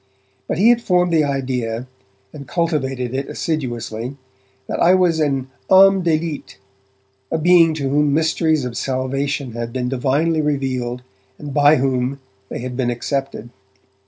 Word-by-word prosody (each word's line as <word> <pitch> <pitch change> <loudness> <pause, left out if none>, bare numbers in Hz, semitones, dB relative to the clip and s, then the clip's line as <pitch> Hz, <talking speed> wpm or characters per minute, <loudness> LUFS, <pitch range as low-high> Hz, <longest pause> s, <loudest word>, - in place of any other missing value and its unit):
But - - -2
he 210 +6 +5
had 240 -1 +4
formed 180 -4 +1
the 160 -2 +4
idea, 125 -4 -2 0.5
and 140 -2 -10
cultivated 135 -7 -1
it 135 +1 -3
assiduously, 125 -4 -4 0.5
that - - -3
I 180 +2 +5
was 175 -3 +2
an 135 -3 -1 0.2
ame 195 0 +7
d'elite, 160 -2 -2 0.7
a 160 - 0
being 165 -1 +5
to 150 - -4
whom 145 +2 +2
the - - +1
mysteries 160 -2 +1
of 120 -2 -5
salvation 135 +1 -2
had 115 0 -5
been 125 0 -2
divinely 145 +5 +1
revealed 130 -4 -2 0.3
and 145 -2 -8
by 145 +1 +5
whom 130 0 -1 0.3
they - - -5
had 125 0 -5
been 125 -1 0
accepted. 135 0 -3
140 Hz, 150 wpm, -19 LUFS, 130-160 Hz, 0.7 s, ame